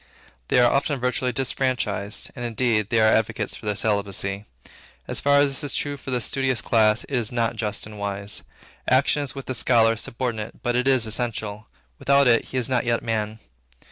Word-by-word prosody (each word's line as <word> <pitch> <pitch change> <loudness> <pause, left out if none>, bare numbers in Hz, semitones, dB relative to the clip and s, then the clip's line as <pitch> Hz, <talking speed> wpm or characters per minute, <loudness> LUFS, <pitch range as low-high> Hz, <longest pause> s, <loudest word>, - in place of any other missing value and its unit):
They - - +2
are 120 -1 +5
often 140 0 0
virtually 125 0 0
disfranchised; 125 -5 -2
and, 120 - -6
indeed, 115 -3 0
there 110 -1 +3
are - - +5
advocates 110 - -1
for - - -9
their 105 - 0
celibacy. 100 -1 -1 0.6
As - - 0
far 140 0 +3
as 140 -1 +2
this 135 - -1
is 145 - -2
true 145 - -2
of 140 - -11
the 130 -2 -1
studious 130 +1 0
classes, 110 -1 +2
it 140 - -3
is 115 -3 -1
not 115 -2 0
just 105 -2 -2
and 105 -1 -10
wise. 100 0 -1 0.5
Action 135 +3 +3
is 140 -2 -4
with 135 - -7
the 130 - -3
scholar 115 -2 +3
subordinate, 115 -1 -4
but 120 -1 0
it 125 +2 +1
is 130 -4 +4
essential. 110 -2 -2 0.3
Without 140 0 +4
it, 115 -1 +4
he 130 - -5
is 125 - 0
not 125 -2 +1
yet 120 -1 0
man. 110 -1 -2
120 Hz, 200 wpm, -24 LUFS, 110-130 Hz, 0.6 s, are